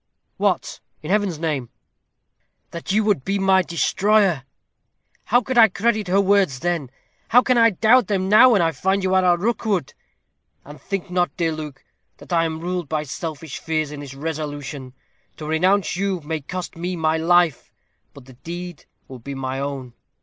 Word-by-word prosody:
"What, -, -, -1 dB, 0.2 s
in 155 Hz, -, -4 dB
Heaven's 200 Hz, -5 st, +1 dB
name?" 150 Hz, -7 st, -3 dB, 1.0 s
"That 170 Hz, +2 st, -5 dB
you 215 Hz, +2 st, +2 dB
would 205 Hz, -11 st, +1 dB
be 195 Hz, +5 st, -1 dB
my 190 Hz, -1 st, +4 dB
destroyer. 185 Hz, -2 st, +1 dB, 0.8 s
How 245 Hz, +3 st, +3 dB
could 255 Hz, -1 st, 0 dB
I 225 Hz, -, +9 dB
credit 215 Hz, +1 st, -1 dB
her 190 Hz, +2 st, +2 dB
words 195 Hz, -9 st, +2 dB
then? 170 Hz, -6 st, -1 dB, 0.4 s
How 245 Hz, +2 st, +5 dB
can 255 Hz, -, +2 dB
I 230 Hz, -1 st, +6 dB
doubt 220 Hz, +3 st, +3 dB
them 190 Hz, -2 st, -1 dB
now, 230 Hz, +5 st, +7 dB
when 195 Hz, -5 st, +3 dB
I 165 Hz, -, +2 dB
find 190 Hz, +6 st, -1 dB
you 190 Hz, 0 st, 0 dB
are 185 Hz, 0 st, +4 dB
a 175 Hz, -1 st, +4 dB
Rookwood? 205 Hz, -, -1 dB, 0.7 s
And 145 Hz, +1 st, -12 dB
think 195 Hz, -2 st, -5 dB
not, 180 Hz, -1 st, +1 dB
dear 165 Hz, -2 st, 0 dB
Luke, 150 Hz, -3 st, -8 dB, 0.3 s
that -, -, -9 dB
I 165 Hz, -1 st, +3 dB
am 160 Hz, 0 st, -4 dB
ruled 175 Hz, -3 st, -3 dB
by 155 Hz, 0 st, -1 dB
selfish 155 Hz, +1 st, -6 dB
fears 155 Hz, -2 st, -2 dB
in 150 Hz, -, -7 dB
this 140 Hz, -2 st, -9 dB
resolution. 145 Hz, -3 st, -5 dB, 0.4 s
To 155 Hz, -, -7 dB
renounce 180 Hz, +6 st, +1 dB
you 195 Hz, 0 st, -1 dB
may 155 Hz, +1 st, -4 dB
cost 180 Hz, +5 st, -6 dB
me 175 Hz, +2 st, -4 dB
my 160 Hz, -1 st, +1 dB
life; 170 Hz, -3 st, +2 dB, 0.4 s
but 140 Hz, -3 st, -13 dB
the 130 Hz, -, -14 dB
deed 175 Hz, +5 st, -8 dB, 0.2 s
will 130 Hz, -2 st, -10 dB
be 140 Hz, +4 st, -7 dB
my 135 Hz, 0 st, -4 dB
own. 135 Hz, -3 st, -5 dB
175 Hz, 180 wpm, -22 LUFS, 150-195 Hz, 1.0 s, I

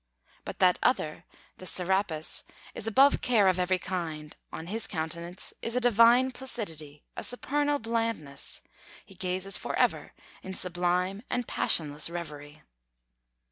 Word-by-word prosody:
But -, -, -6 dB
that 180 Hz, -1 st, +4 dB
other, 155 Hz, -11 st, 0 dB, 0.3 s
the 185 Hz, -, -8 dB
Serapis, 180 Hz, -4 st, 0 dB, 0.3 s
is 220 Hz, -, -6 dB
above 270 Hz, +6 st, +5 dB
care 220 Hz, -6 st, +4 dB
of 185 Hz, -1 st, +3 dB
every 180 Hz, +1 st, +2 dB
kind; 165 Hz, -5 st, -5 dB, 0.2 s
on 160 Hz, -, -6 dB
his 220 Hz, +6 st, -1 dB
countenance 170 Hz, +2 st, -4 dB
is 230 Hz, -, -3 dB
a -, -, +3 dB
divine 245 Hz, +2 st, +5 dB
placidity, 165 Hz, -, -6 dB
a -, -, -5 dB
supernal 290 Hz, +3 st, 0 dB
blandness; 225 Hz, -, -3 dB, 0.4 s
he -, -, -15 dB
gazes 185 Hz, +1 st, -1 dB
for -, -, -3 dB
ever -, -, +1 dB, 0.3 s
in 190 Hz, 0 st, -7 dB
sublime 180 Hz, +2 st, 0 dB
and 245 Hz, -2 st, -1 dB
passionless 150 Hz, -1 st, +2 dB
reverie. 150 Hz, -4 st, -8 dB
185 Hz, 135 wpm, -29 LUFS, 165-230 Hz, 0.4 s, above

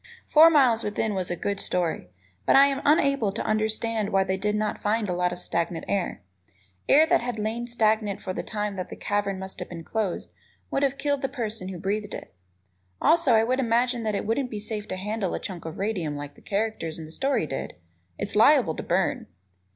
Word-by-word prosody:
"Four 315 Hz, +2 st, +7 dB
Miles 255 Hz, -8 st, +4 dB
Within" 210 Hz, +1 st, -1 dB
was 185 Hz, -2 st, -2 dB
a 175 Hz, -, -1 dB
good 200 Hz, +3 st, -2 dB
story, 175 Hz, -, -1 dB, 0.4 s
but -, -, +5 dB
I 275 Hz, +1 st, +9 dB
am 280 Hz, 0 st, 0 dB
unable 275 Hz, -7 st, +3 dB
to 215 Hz, -, -3 dB
understand 215 Hz, 0 st, 0 dB
why 195 Hz, 0 st, +3 dB
they 190 Hz, 0 st, -1 dB
did 210 Hz, +2 st, -1 dB
not 210 Hz, 0 st, -2 dB
find 210 Hz, +1 st, 0 dB
a 180 Hz, -, -1 dB
lot 180 Hz, 0 st, +1 dB
of 175 Hz, -, -6 dB
stagnant 170 Hz, -1 st, -2 dB
air. 195 Hz, -, -2 dB, 0.7 s
Air 300 Hz, +3 st, +7 dB
that 345 Hz, -3 st, +3 dB
had 240 Hz, -1 st, -3 dB
lain 225 Hz, +3 st, -2 dB
stagnant 215 Hz, -3 st, +1 dB
for 185 Hz, -, -4 dB
the -, -, -3 dB
time 210 Hz, -2 st, -3 dB
that 185 Hz, -, -6 dB
cavern 205 Hz, -1 st, -1 dB
must 190 Hz, 0 st, -7 dB
have 180 Hz, -, -5 dB
been 165 Hz, -2 st, -7 dB
closed 210 Hz, -1 st, -3 dB, 0.4 s
would 275 Hz, -, 0 dB
have 275 Hz, -1 st, +1 dB
killed 285 Hz, -1 st, 0 dB
the 270 Hz, -, -1 dB
person 225 Hz, -7 st, -4 dB
who 190 Hz, -1 st, -5 dB
breathed 205 Hz, +3 st, -2 dB
it. -, -, -10 dB, 0.7 s
Also, 335 Hz, -7 st, +4 dB
I 220 Hz, -, +5 dB
would 255 Hz, +3 st, 0 dB
imagine 240 Hz, 0 st, +1 dB
that 215 Hz, -2 st, -1 dB
it -, -, -2 dB
wouldn't 245 Hz, +4 st, 0 dB
be 215 Hz, -, -5 dB
safe 210 Hz, 0 st, -4 dB
to -, -, -3 dB
handle 205 Hz, 0 st, -2 dB
a -, -, -3 dB
chunk 180 Hz, -5 st, -6 dB
of 160 Hz, -, -6 dB
radium 190 Hz, -8 st, -2 dB
like 145 Hz, 0 st, -7 dB
the -, -, -19 dB
characters 200 Hz, -6 st, -2 dB
in 160 Hz, -, -7 dB
the 155 Hz, -, -12 dB
story 270 Hz, -, 0 dB
did; 135 Hz, -, -5 dB, 0.4 s
it's -, -, -4 dB
liable -, -, +5 dB
to -, -, -3 dB
burn. -, -, 0 dB
210 Hz, 215 wpm, -26 LUFS, 190-235 Hz, 0.7 s, I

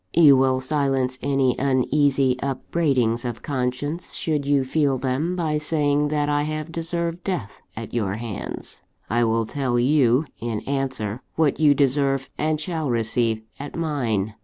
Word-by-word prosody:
"You 155 Hz, -4 st, +8 dB
will 130 Hz, 0 st, +3 dB
silence 130 Hz, -2 st, 0 dB
any 135 Hz, -3 st, +2 dB
uneasy 135 Hz, 0 st, +2 dB
upbraidings 130 Hz, -4 st, 0 dB
of 120 Hz, -2 st, -5 dB
conscience, 140 Hz, +5 st, -3 dB
should 150 Hz, -3 st, -1 dB
you 140 Hz, -2 st, +3 dB
feel 140 Hz, 0 st, +1 dB
them, 135 Hz, +8 st, -1 dB
by 155 Hz, -4 st, 0 dB
saying 150 Hz, -1 st, +1 dB
that 145 Hz, 0 st, 0 dB
I 145 Hz, 0 st, +1 dB
have 155 Hz, +2 st, -3 dB
deserved 170 Hz, +1 st, -3 dB
death 175 Hz, -, -4 dB
at 115 Hz, 0 st, -7 dB
your 105 Hz, -5 st, -1 dB
hands. 115 Hz, -2 st, -7 dB, 0.3 s
I 120 Hz, +1 st, +3 dB
will 115 Hz, 0 st, +1 dB
tell 125 Hz, 0 st, -1 dB
you, 130 Hz, +1 st, +3 dB
in 115 Hz, -2 st, -3 dB
answer, 130 Hz, -5 st, -3 dB
what 155 Hz, -3 st, +2 dB
you 150 Hz, -2 st, +5 dB
deserve 135 Hz, -1 st, +1 dB
and 155 Hz, 0 st, 0 dB
shall 160 Hz, -2 st, -3 dB
receive 115 Hz, -1 st, 0 dB, 0.2 s
at 145 Hz, -, -7 dB
mine. 120 Hz, -11 st, -1 dB
135 Hz, 150 wpm, -23 LUFS, 125-150 Hz, 0.3 s, You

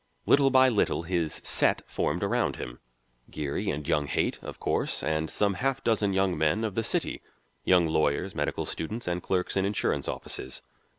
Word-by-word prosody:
Little 140 Hz, -1 st, +5 dB
by 130 Hz, 0 st, +6 dB
little 105 Hz, -7 st, +1 dB
his 85 Hz, -2 st, -1 dB
"set" -, -, +2 dB
formed -, -, -1 dB
around -, -, +1 dB
him; -, -, -7 dB, 0.5 s
Geary 70 Hz, -2 st, -3 dB
and 75 Hz, 0 st, -3 dB
young 75 Hz, -1 st, +1 dB
Haight, -, -, 0 dB
of -, -, -8 dB
course, -, -, 0 dB
and 80 Hz, 0 st, 0 dB
some 100 Hz, -1 st, +1 dB
half 135 Hz, +6 st, -1 dB
dozen 105 Hz, -3 st, +2 dB
young 95 Hz, -1 st, +1 dB
men 80 Hz, +8 st, +1 dB
of 110 Hz, -3 st, -1 dB
the 115 Hz, -, -1 dB
city: -, -, -1 dB, 0.4 s
young 90 Hz, -2 st, +5 dB
lawyers, 80 Hz, +3 st, +1 dB
medical 75 Hz, -2 st, -2 dB
students, 110 Hz, +8 st, -4 dB
and 90 Hz, 0 st, -1 dB
clerks 90 Hz, 0 st, -1 dB
in 95 Hz, -, +2 dB
insurance 100 Hz, +1 st, 0 dB
offices. 65 Hz, -, -3 dB
90 Hz, 175 wpm, -28 LUFS, 80-105 Hz, 0.5 s, by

